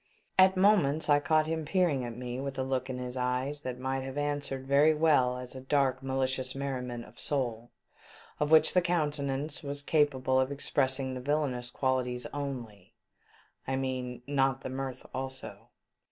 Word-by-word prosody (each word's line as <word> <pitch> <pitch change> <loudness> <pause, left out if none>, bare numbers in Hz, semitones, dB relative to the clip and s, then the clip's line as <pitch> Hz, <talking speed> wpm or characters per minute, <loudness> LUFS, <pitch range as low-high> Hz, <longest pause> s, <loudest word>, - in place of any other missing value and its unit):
At 190 0 +6
moments 180 -7 +3
I 145 0 +6
caught 155 +1 +2
him 160 0 -2
peering 155 -5 +1
at 120 -1 -6
me 125 0 -5
with 135 0 -4
a 130 - 0
look 130 0 -2
in 130 - -3
his 125 0 -5
eyes 130 +3 -1
that 130 -3 -5
might 130 +1 -2
have 135 +1 -6
answered 145 -2 -1
very 145 +3 +4
well 145 -6 +3
as 125 -1 -6
a 130 - -8
dark 130 -1 +1
malicious 130 -1 -1
merriment 125 -3 -4
of - - -16
soul, 120 -5 -2 0.7
of 150 - +1
which 160 0 +6
the 180 - +5
countenance 150 -4 -1
was 145 -1 -4
capable 135 -4 +2
of 130 +1 +1
expressing 135 -1 +1
the 130 - -5
villainous 130 -3 -1
qualities 125 -2 -1
only, 130 -8 -6 0.7
I 135 - 0
mean, 130 -2 -3
not 135 -1 +1
the - - -5
mirth 130 0 -5
also. 130 0 -6
135 Hz, 170 wpm, -30 LUFS, 130-145 Hz, 0.7 s, At